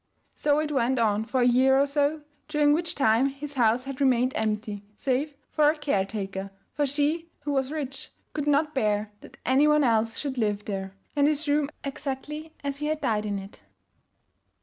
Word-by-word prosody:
So 290 -1 +1
it 305 0 0
went 260 -1 +1
on 220 -2 +2
for 255 +2 0
a 245 - +5
year 260 +2 +5
or 280 - +4
so, 290 +2 0 0.2
during 295 -1 +3
which 335 +2 0
time 250 -1 +3
his 280 +1 -6
house 240 -1 +3
had 275 +1 -6
remained 255 -1 +3
empty, 210 -1 -2
save 280 +5 -1 0.2
for 300 -1 +4
a 310 - 0
caretaker, 195 -7 -2 0.2
for 290 -1 +1
she 300 +4 0
(who 290 0 -3
was 270 -1 0
rich) 280 -4 -5 0.2
could 295 -1 -3
not 295 +1 +2
bear 210 -4 0
that - - -14
any 270 +4 +4
one 300 0 +4
else 225 -2 +2
should 270 -3 -3
live 210 -2 0
there, 195 -1 -4 0.2
and 285 0 +4
his 305 0 +1
room 290 0 +2
exactly 295 +3 -5
as 280 0 -3
he 300 - -2
had 310 0 -1
died 215 -5 0
in 200 -1 -1
it. 195 +1 -10
270 Hz, 190 wpm, -26 LUFS, 225-295 Hz, 0.2 s, a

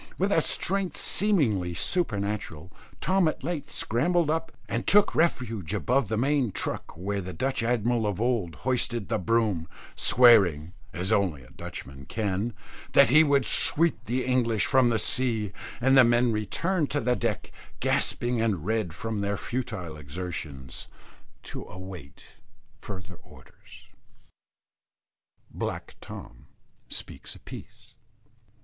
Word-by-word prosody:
With 195 +3 +1
a 165 - +4
strength 190 +1 0
seemingly 115 - +1
supernatural, 100 - -1 0.3
Tom 185 +1 +3
at 155 - -2
length 150 -2 -3
scrambled 155 +7 +1
up, 165 +1 -2 0.2
and 115 +1 -3
took 205 0 +5
refuge 115 - 0
above 125 +3 +1
the 110 - -1
main 135 -1 +1
truck 80 - -4
where 100 +3 -2
the 90 0 -6
Dutch 130 +9 -1
Admiral 115 -1 +1
of 100 -2 -2
old 115 -9 0
hoisted 120 -5 0
the - - 0
broom, 105 -4 +1 0.3
swearing, 95 -10 +5 0.2
as 90 +2 -3
only 85 -10 +1
Dutchmen 70 0 -8
can, 105 +1 -2 0.4
that - - +7
he 155 +5 +7
would 140 -4 +3
sweep 150 +1 +2
the 125 +2 -1
English 120 -4 +2
from 130 -2 +4
the 115 - +2
sea; 110 -4 +2 0.3
and 135 +2 +4
the 130 - +9
men 120 0 +3
returned 150 - 0
to 145 - 0
the 125 -3 +1
deck, - - -2 0.3
gasping 120 -1 0
and 100 -8 0
red 110 -7 -1
from 110 0 -3
their 100 0 -1
futile 100 -10 -4
exertions, 75 -3 -7 0.6
to - - -7
await 95 -6 -11 0.4
further 95 -4 -8
orders. - - -17 1.7
BLACK - - -5
TOM - - -11 0.4
SPEAKS - - -6
A - - -14
PIECE. 115 +2 -12
115 Hz, 130 wpm, -27 LUFS, 95-130 Hz, 1.7 s, the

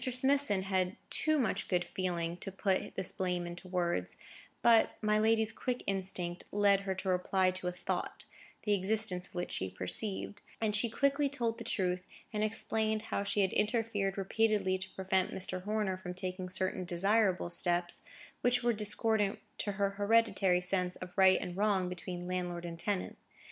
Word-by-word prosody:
Smithson 260 -5 +2
had 185 -1 0 0.2
too 310 0 +3
much 240 -8 0
good 180 -1 +1
feeling 175 -2 -2
to 195 - -3
put 195 0 -1
this 190 -1 +2
blame 180 -2 -1
into 175 +1 -7
words; 170 - -1 0.5
but 230 -1 +5
my 215 0 +2
lady's 220 0 +3
quick 250 -1 -3
instinct 185 -2 -3
led 200 -1 +4
her 195 -1 -3
to 190 +1 -6
reply 185 0 +2
to 185 -1 -4
a - - 0
thought, 175 0 -4 0.4
the 210 - +2
existence 200 -1 0
of - - -20
which 175 0 -3
she 95 - -2
perceived; 195 - -4 0.2
and 215 -2 +1
she 230 +3 +3
quietly 280 +4 +2
told 235 -5 -2
the - - -5
truth, 180 -5 -1 0.3
and 210 0 0
explained 220 0 0
how - - +1
she 205 0 0
had 190 - +1
interfered 210 -2 0
repeatedly 200 -1 +1
to 190 0 -6
prevent 190 -1 +1
Mr. 185 -1 -2
Horner 210 -3 0
from 180 -1 -7
taking 185 0 -4
certain 185 0 -1
desirable 185 +1 +1
steps, 175 0 0 0.4
which 245 0 +2
were 240 0 +3
discordant 210 -1 +2 0.2
to 205 - -1
her 200 0 0
hereditary 200 -3 +3
sense 180 0 0
of 180 -1 -9
right 190 -1 +6
and 175 - -5
wrong 195 -2 +2
between 180 0 -6
landlord 180 -1 -3
and 165 -1 -6
tenant. 195 +1 -2
190 Hz, 170 wpm, -33 LUFS, 180-215 Hz, 0.5 s, right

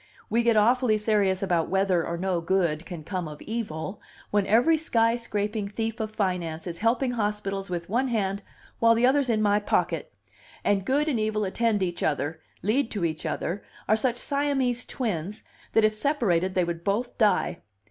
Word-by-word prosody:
We 230 - +3
get 235 -2 +3
awfully 235 +1 +4
serious 205 -3 +1
about 175 -4 +1
whether 190 -3 +2
or 170 +1 -3
no 180 -1 -1
good 170 -2 0
can 170 -4 -7
come 180 0 -3
of 150 -1 -9
evil, 205 -4 -4 0.3
when 205 -1 +2
every 245 +10 +5
sky 230 -7 +2
scraping 210 -2 -2
thief 225 +2 -3
of 220 -1 -2
finance 180 -6 -2
is 170 -2 -5
helping 240 +4 +1
hospitals 205 -4 -2
with 170 -1 -3
one 245 +6 +1
hand 200 -4 -1 0.4
while 230 0 +5
the 235 +2 +3
other's 270 0 +3
in 215 -2 +2
my 205 0 +3
pocket; 175 -6 -1 0.5
and 195 -2 +1
good 285 +5 +1
and 265 -7 +1
evil 215 0 0
attend 210 +1 +1
each 175 -1 -3
other, 150 +1 -1 0.2
lead 230 +5 +1
to 200 -5 -2
each 160 -1 -3
other, 185 +4 -3 0.2
are 215 - +5
such 240 +2 0
Siamese 270 -3 0
twins 205 -5 -3 0.3
that 225 - +5
if 215 - +3
separated 215 - +1
they 185 - +3
would 170 -1 -4
both 215 +6 -1
die. 210 -6 +2
210 Hz, 180 wpm, -26 LUFS, 180-230 Hz, 0.5 s, every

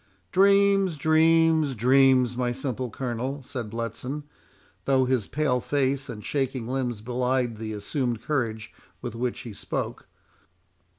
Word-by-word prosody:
"Dreams, 195 -2 +4
dreams, 160 -1 +4
dreams, 130 +1 +4
my 125 0 0
simple 130 -1 -3
Colonel," 130 +4 -4
said 120 -3 -5
Bletson, 120 +6 -4 0.6
though, 135 -1 +3
his 125 -5 0
pale 140 -4 0
face 135 0 0
and 105 -1 -7
shaking 130 -4 -2
limbs 125 -4 -2
belied 125 0 -1
the 110 0 -5
assumed 115 +2 -2
courage 115 -7 -2 0.3
with 120 -3 -4
which 120 +2 -3
he 120 -5 -8
spoke. - - -4
130 Hz, 125 wpm, -26 LUFS, 120-140 Hz, 0.6 s, Dreams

